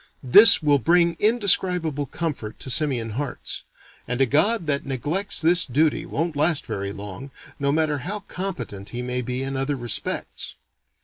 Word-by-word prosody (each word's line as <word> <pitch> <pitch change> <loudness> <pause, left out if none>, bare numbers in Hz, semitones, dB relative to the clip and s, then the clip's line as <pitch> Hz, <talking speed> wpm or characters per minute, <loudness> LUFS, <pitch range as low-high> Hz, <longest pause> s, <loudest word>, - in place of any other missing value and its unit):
This 175 - +8
will 145 -2 +3
bring 170 +4 +3
indescribable 180 - +2
comfort 145 -9 -5
to 130 - -3
simian 125 -7 +1
hearts; 135 +4 -5 0.4
and 125 +1 -3
a 135 - +5
god 170 - +2
that 140 -2 0
neglects 145 - -1
this 170 +2 +4
duty 150 +4 0
won't 165 +1 -2
last 155 +1 +1
very 100 -3 -4
long, 100 +6 -8 0.3
no 140 0 +1
matter 155 -1 0
how 200 +10 -5
competent 180 - -6
he 125 0 -5
may 125 0 -3
be 125 +2 -4
in 135 0 -4
other 135 +2 -1
respects. 120 -4 -4
145 Hz, 160 wpm, -23 LUFS, 125-170 Hz, 0.4 s, This